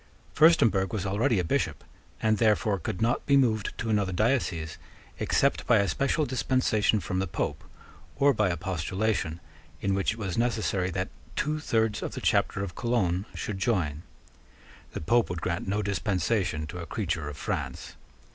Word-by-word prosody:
Furstemburg 115 - +4
was 100 -3 -2
already 110 +5 +1
a 90 - +1
Bishop, 80 - -1 0.4
and 110 -1 +3
therefore 105 -3 +2
could 90 +4 -3
not 120 +2 +1
be 140 -1 +5
moved 110 -6 +2
to 115 -1 -2
another 100 -3 +1
diocese 95 - 0 0.4
except - - +1
by - - +6
a 100 - +2
special 140 - +1
dispensation 125 -5 +1
from 95 0 -2
the 95 - -1
Pope, 80 - -3 0.5
or 140 0 +4
by 105 -4 +2
a 85 - -1
postulation, 95 0 -1 0.4
in 100 +3 0
which 95 +2 +1
it - - -12
was 95 -3 -3
necessary 110 -6 0
that 95 0 -2 0.3
two 155 +1 0
thirds 110 -7 0
of - - -4
the - - -4
Chapter 95 - +1
of 95 -3 -5
Cologne 100 -5 0
should 100 -3 -4
join. 85 -9 0 0.9
The - - -4
Pope 115 +9 +2
would 90 -1 -3
grant 85 +1 -2
no 105 +2 0
dispensation 95 -4 0
to 90 +4 -7
a 85 - -6
creature 85 -8 -2
of 75 - -8
France. - - -4
100 Hz, 170 wpm, -28 LUFS, 90-115 Hz, 0.9 s, by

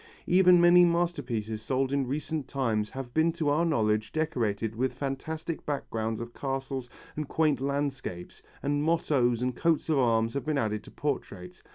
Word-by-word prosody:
Even 180 0 +6
many 175 +1 +7
masterpieces 140 -11 0
sold 130 +3 0
in 140 -2 +1
recent 150 +1 -3
times 110 -7 -1
have 130 -2 -7
been 160 +3 +3
to 160 -3 -1
our 150 +4 +2
knowledge 110 -9 +1
decorated 115 -9 -1
with 125 +2 -1
fantastic 155 +5 -4
backgrounds 115 -6 -3
of 120 0 -7
castles 135 -2 -4 0.3
and 150 -1 -3
quaint 150 -5 +1
landscapes, 135 -10 -3 0.2
and 145 +1 0
mottoes 140 -7 +1
and 125 -1 -1
coats 165 +3 +1
of 150 -3 +3
arms 115 -2 +2
have 140 - -2
been 155 -2 +1
added 105 -4 -1
to - - -11
portraits. 95 -11 -4
135 Hz, 165 wpm, -28 LUFS, 115-155 Hz, 0.3 s, many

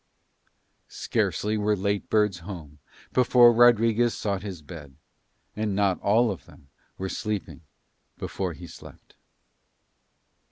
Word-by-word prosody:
Scarcely 105 +1 -1
were 105 0 +1
late 100 +1 -2
birds 105 -4 +2
home 80 -5 -10 0.3
before 125 -1 +6
Rodriguez 115 0 +4
sought 100 -3 -2
his 95 -6 -7
bed, 75 -3 -11 0.6
and 105 -2 -2
not 100 -2 +1
all 110 +3 +3
of 95 - -9
them 70 - -19 0.3
were 95 - -3
sleeping 105 -4 -4 0.6
before 95 -3 -4
he 85 +3 -11
slept. 85 - -14
100 Hz, 115 wpm, -26 LUFS, 90-110 Hz, 0.6 s, before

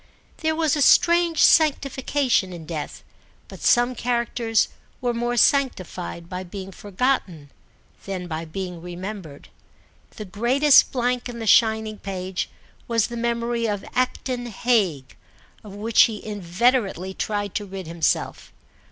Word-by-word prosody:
There 315 -1 -1
was 315 -2 +1
a 295 - -1
strange 340 +3 +4
sanctification 275 - +2
in 165 -2 -9
death, 155 -2 -6 0.4
but - - -12
some 245 +1 +3
characters 235 -2 0 0.3
were 245 -1 -1
more 240 +1 -2
sanctified 185 - 0
by 180 +1 -5
being 190 +1 -8
forgotten 190 - -2 0.5
than 190 -2 -4
by 160 0 -4
being 180 +1 -6
remembered. 180 -3 -8 0.7
The 215 - -7
greatest 250 +9 +4
blank 250 -1 -1
in 240 - -7
the 225 - -5
shining 220 -1 +3
page 185 -1 -4 0.4
was 230 -2 +1
the 235 - -6
memory 235 0 -1
of 205 -2 -3
Acton 250 -1 -1
Hague, 195 - 0 0.5
of 205 -2 -11
which 220 +2 +3
he 215 -2 -7
inveterately 200 0 0
tried 205 -1 -3
to 205 - -3
rid 190 -1 -7
himself. 165 -1 -2
220 Hz, 130 wpm, -23 LUFS, 185-245 Hz, 0.7 s, strange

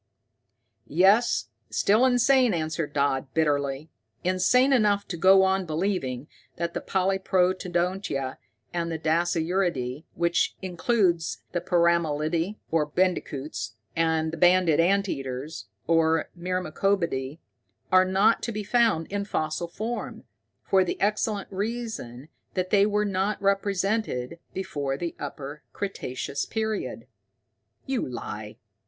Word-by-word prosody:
"Yes, 190 - +3 0.2
still 205 - +3
insane," 250 -3 +4
answered 160 -1 -2
Dodd 140 -2 0
bitterly. 145 -1 0 0.3
"Insane 185 +9 +3
enough 205 -5 +2
to 175 - -3
go 190 +3 +6
on 190 -1 +1
believing 155 -6 -2 0.3
that 170 0 -3
the - - -3
polyprotodontia 185 -5 0 0.4
and 170 -1 -2
the 160 - -2
dasyuridae, 165 -3 0
which 170 0 +1
includes 185 -2 0
the 175 - -1
peramelidae, 170 0 +1 0.2
or 160 -2 +2
bandicoots, 150 -8 -2 0.2
and 160 -1 +1
the - - -4
banded 175 -2 +4
ant 195 +4 +3
eaters, 135 0 -5 0.2
or 165 -1 +2
myrmecobidae, 175 -5 -1 0.5
are 185 0 +7
not 195 +4 +3
to 230 - -3
be 210 -1 -4
found 225 -6 +2
in 200 0 -1
fossil 160 -3 -2
form, 225 +7 -5 0.4
for 190 -1 +4
the 180 - -3
excellent 210 0 0
reason 200 - -4 0.3
that 185 -1 -1
they 205 0 +5
were 210 0 +1
not 195 +1 -1
represented 195 - 0
before 145 -7 -3
the 170 +2 -4
Upper 145 +1 -6
Cretaceous 140 -8 -4
period." 220 -1 -3 0.8
"You 265 - -2
lie! 110 -3 -7
175 Hz, 115 wpm, -26 LUFS, 155-200 Hz, 0.8 s, are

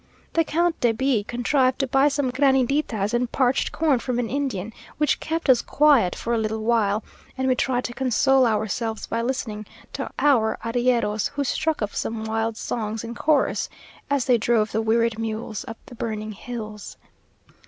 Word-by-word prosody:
The 330 - +3
Count 335 +2 0
de 235 -2 +3
B 250 -2 +1
contrived 255 +3 +1
to 275 - 0
buy 270 +2 +3
some 280 -3 0
graniditas 265 -5 +1
and 240 0 0
parched 260 0 +1
corn 300 -6 +2
from 250 0 -2
an 240 -2 -2
Indian, 245 -7 -2 0.2
which 300 0 +1
kept 325 0 -3
us 255 -3 +5
quiet 280 -11 +3
for 235 - -3
a 230 - +1
little 220 0 -2
while; 220 -2 +1 0.3
and 260 0 0
we 260 - +4
tried 250 0 0
to 240 - -4
console 265 +1 +3
ourselves 220 +1 -2
by 230 - -2
listening 230 -4 -3 0.3
to - - -4
our 245 -7 +3
arrieros, 235 -3 +1
who 285 0 -2
struck 310 0 -1
up 210 - -3
some 225 -1 -3
wild 225 0 -1
songs 220 -2 -3
in 230 0 -6
chorus, 290 +3 +1 0.4
as 280 -3 +1
they 245 -2 +3
drove 220 -1 +1
the 220 - 0
wearied 225 0 +1
mules 220 -1 -4
up 225 - -7
the - - -13
burning 215 -2 -4
hills. 215 -1 -7
240 Hz, 175 wpm, -24 LUFS, 220-270 Hz, 0.4 s, us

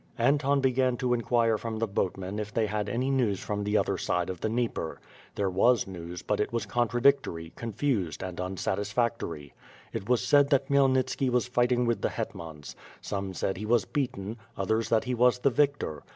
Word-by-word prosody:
Anton 140 +3 +2
began 130 -1 +2
to 125 -1 +1
inquire 115 -1 +2
from 115 0 -4
the 115 - +1
boatmen 95 0 -2
if 105 0 -4
they 110 0 +1
had 105 0 -2
any 125 +3 0
news 115 -8 +1
from 105 -1 -3
the 105 +1 +1
other - - 0
side 90 +1 0
of 90 - -9
the 110 - 0
Dnieper. 115 -8 -2 0.4
There 100 - 0
was 115 +6 +3
news, 90 -2 -7
but 105 - -1
it 105 - 0
was 115 -1 -1
contradictory, 120 -8 +1
confused, 115 - -2
and 90 -2 -6
unsatisfactory. 95 - -2 0.4
It 100 - -5
was 125 -2 +2
said 145 -1 +5
that 135 -2 +2
Khmyelnitski 135 -1 +2
was 125 0 +1
fighting 125 0 +2
with 115 -1 0
the - - +1
hetmans. 80 -3 -6 0.2
Some 95 -2 -4
said 95 - -1
he 105 - -5
was 115 -3 +3
beaten, 115 -4 -3 0.2
others 110 +4 0
that 110 -1 +3
he 125 - -2
was 125 +1 +4
the 135 +2 +2
victor. 140 - 0
115 Hz, 185 wpm, -28 LUFS, 95-125 Hz, 0.4 s, said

